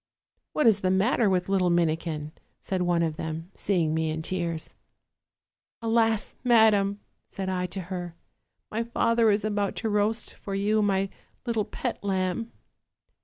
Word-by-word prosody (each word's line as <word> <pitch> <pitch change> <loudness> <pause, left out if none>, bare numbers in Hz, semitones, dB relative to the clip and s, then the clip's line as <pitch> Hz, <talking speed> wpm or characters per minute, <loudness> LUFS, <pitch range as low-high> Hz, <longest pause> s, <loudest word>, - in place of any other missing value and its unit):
'What 300 - +1
is 215 -3 +6
the 185 - +1
matter 205 +4 +3
with 180 -1 +1
the - - -5
little 185 -2 +3
Minikin?' 160 -2 0 0.3
said 185 -1 -2
one 175 -1 +2
of 160 -2 -1
them, 160 +2 -5
seeing 170 -6 0
me 160 0 0
in 160 0 -3
tears. 170 -2 -3 0.5
" - - -68
'Alas! 225 -1 +2
madam,' 215 -4 +4 0.3
said 190 -1 -4
I 180 -1 -1
to 185 +2 -5
her, 175 -1 -6 0.6
'my 220 - -1
father 230 -1 +2
is 205 +1 +2
about 205 -2 0
to 225 - -2
roast 210 +2 0
for 195 - -6
you 210 +2 +2
my 195 -1 +1 0.4
little 225 -4 0
pet - - -4
lamb.' 190 +3 -1
195 Hz, 160 wpm, -27 LUFS, 175-215 Hz, 0.6 s, is